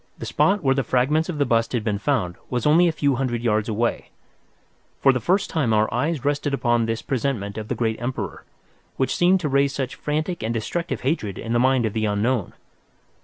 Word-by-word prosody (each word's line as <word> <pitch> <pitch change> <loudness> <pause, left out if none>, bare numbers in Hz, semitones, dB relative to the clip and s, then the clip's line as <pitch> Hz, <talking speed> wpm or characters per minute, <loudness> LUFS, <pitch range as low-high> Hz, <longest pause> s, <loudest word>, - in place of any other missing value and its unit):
The - - -6
spot 200 -2 +2
where 135 -1 +4
the 135 - +1
fragments 140 +8 +1
of 165 - -3
the 145 - +2
bust 115 -2 +1
had 120 -3 0
been 105 -3 -1
found 110 -9 0 0.2
was 125 -2 -2
only 165 +4 +5
a - - +2
few 145 -4 0
hundred 120 -3 -2
yards 110 -1 +1
away. 115 +2 -1 0.9
For 135 - +5
the 125 - 0
first 190 +9 +1
time 140 -9 +1
our 110 0 +2
eyes 150 -3 -1
rested 145 -1 0
upon 120 -3 +1
this 115 0 -2
presentment 115 -6 -2
of 110 -1 -5
the 125 - -2
great 110 0 -1
emperor, 125 +2 -4 0.5
which 130 - 0
seemed 180 +1 +3
to 155 - -1
raise 140 0 +2
such 135 -2 -3
frantic 155 +4 -3
and 115 +1 -2
destructive 170 +10 -3
hatred 125 - -1
in 115 +1 -4
the 120 - +3
mind 130 -1 +3
of 110 - -2
the 110 -1 0
unknown. 105 +1 0
125 Hz, 215 wpm, -23 LUFS, 115-145 Hz, 0.9 s, only